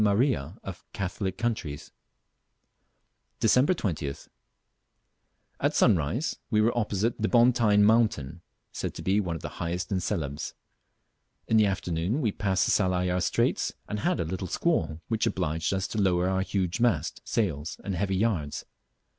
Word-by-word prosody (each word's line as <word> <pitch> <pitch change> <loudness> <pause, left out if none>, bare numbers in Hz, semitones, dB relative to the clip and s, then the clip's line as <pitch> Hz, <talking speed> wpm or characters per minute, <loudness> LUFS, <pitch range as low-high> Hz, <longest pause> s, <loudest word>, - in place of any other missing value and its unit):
Maria" 100 - +1
of 95 -3 -8
Catholic 95 0 -3
countries. 95 -11 -3 1.5
Dec. 125 +4 +4
20th. 85 - -2 1.3
At - - +1
sunrise 95 - +2
we 110 -4 +2
were 115 +3 +3
opposite 110 0 0
the 110 - +2
Bontyne 115 -4 +4
mountain, 105 - +2 0.3
said - - -4
to - - -7
be 95 +2 +2
one 90 -5 -2
of 80 - -8
the - - -7
highest 85 +3 -3
in 95 - +1
Celebes. 80 -7 -3 0.9
In 110 - +3
the 105 -1 +5
afternoon 95 - -1
we 115 -8 +1
passed 95 -1 +1
the - - +1
Salayer 90 -2 +1
Straits - - +1
and 105 - -3
had - - 0
a 85 - 0
little 95 +3 -4
squall, 85 - 0
which 110 -1 0
obliged 80 -3 -1
us 95 0 -1
to 110 - -1
lower 90 -2 +2
our 95 0 +1
huge 95 0 -1
mast, 120 -2 +1
sails, 80 -8 -2
and 100 - -3
heavy 95 +2 0
yards. 95 -8 -1
95 Hz, 150 wpm, -27 LUFS, 85-110 Hz, 1.5 s, the